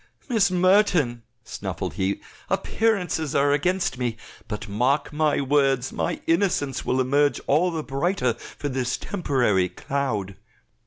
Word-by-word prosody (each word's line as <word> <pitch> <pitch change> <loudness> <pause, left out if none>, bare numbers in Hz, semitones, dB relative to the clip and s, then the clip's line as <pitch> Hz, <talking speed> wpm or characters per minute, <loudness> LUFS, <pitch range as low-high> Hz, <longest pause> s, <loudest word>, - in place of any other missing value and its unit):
"Miss 225 -7 +3
Merton," 180 - +3 0.2
snuffled - - -5
he, 95 +1 -1 0.3
"appearances 180 -9 0
are 140 +1 +3
against 175 -1 0
me, 120 -2 -1 0.3
but 105 -1 -5
mark 125 +9 0
my 150 -1 +2
words, 135 -2 +2
my - - -2
innocence 165 -7 +1
will 130 - 0
emerge 140 +3 +2
all 160 +6 +3
the 160 -3 -3
brighter 135 -2 0
for 120 +5 -8
this 125 -2 -1
temporary 125 - +1
cloud." 110 -9 -3
140 Hz, 125 wpm, -24 LUFS, 125-175 Hz, 0.3 s, Miss